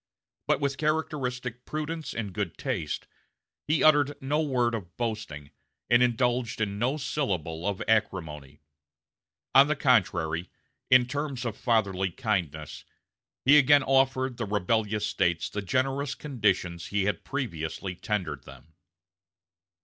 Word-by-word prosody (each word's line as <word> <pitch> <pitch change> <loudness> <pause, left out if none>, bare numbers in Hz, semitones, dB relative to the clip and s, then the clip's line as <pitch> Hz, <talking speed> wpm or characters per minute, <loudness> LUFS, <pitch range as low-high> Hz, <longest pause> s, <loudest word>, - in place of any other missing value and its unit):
But - - +2
with 140 -1 -1
characteristic 130 -6 -2
prudence 155 +1 -4
and 105 -5 -4
good 100 -4 -3
taste, 95 - -3 0.6
he 155 +1 +2
uttered 145 -2 +4
no 145 +3 0
word 125 -6 +1
of 90 -6 -6
boasting, 105 -12 -4 0.4
and 120 +1 +6
indulged 120 -1 +1
in 100 -2 -2
no 130 +6 +1
syllable 90 - -2
of 100 -2 -2
acrimony; 80 -10 -1 0.9
on 135 +2 +8
the 150 - +1
contrary, 90 - +1 0.4
in 125 -1 +6
terms 140 -1 -3
of 115 -3 -2
fatherly 100 -6 +1
kindness 85 - -3 0.6
he 145 +3 +8
again 145 0 +5
offered 130 -1 +2
the 115 - -3
rebellious 105 +1 0
States 85 -4 0
the 105 - -3
generous 135 +7 -1
conditions 100 - -1
he 100 -1 0
had 100 -4 -1
previously 95 - -4
tendered 90 -5 -3
them. 80 +2 -14
115 Hz, 125 wpm, -27 LUFS, 95-135 Hz, 0.9 s, on